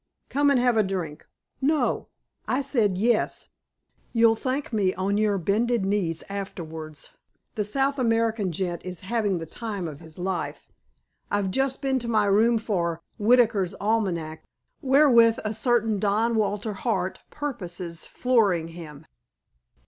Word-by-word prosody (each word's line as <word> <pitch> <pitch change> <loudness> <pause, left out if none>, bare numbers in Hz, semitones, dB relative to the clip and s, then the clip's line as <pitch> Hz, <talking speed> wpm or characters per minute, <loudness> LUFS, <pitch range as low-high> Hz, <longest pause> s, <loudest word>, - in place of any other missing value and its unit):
"Come 285 +1 +3
and 275 -3 +4
have 245 -2 +3
a - - +6
drink." 180 -6 -4 0.3
"No." 300 +2 +1 0.4
"I 255 - +1
say 265 -6 +2
'yes.' 215 +4 0 0.6
You'll 230 -1 +5
thank 255 +3 -3
me 195 -4 +1
on 200 +2 0
your 210 -2 +2
bended 215 +4 +1
knees 190 -5 0
afterwards. 160 -6 -7 0.4
The 210 - -1
South 270 +6 0
American 225 -4 +1
gent 175 0 -3
is 180 -2 -6
having 205 -2 0
the 165 - -5
time 200 0 -5
of 145 -3 -8
his 160 -1 -12
life. 180 0 -3 0.6
I've 200 -2 0
just 270 +5 0
been 265 -1 +1
to 240 - -6
my 215 -3 +2
room 220 +4 +4
for 170 -7 -2 0.2
Whitaker's 210 -4 +3
Almanack, 185 -8 -1 0.4
wherewith 260 -5 +5
a 215 0 -2
certain 225 -2 +1
Don 215 +4 +1
Walter 210 0 0
Hart 190 -3 -2
purposes 180 - -5
flooring 205 -10 +1
him." 160 -3 -10
210 Hz, 140 wpm, -25 LUFS, 185-235 Hz, 0.6 s, a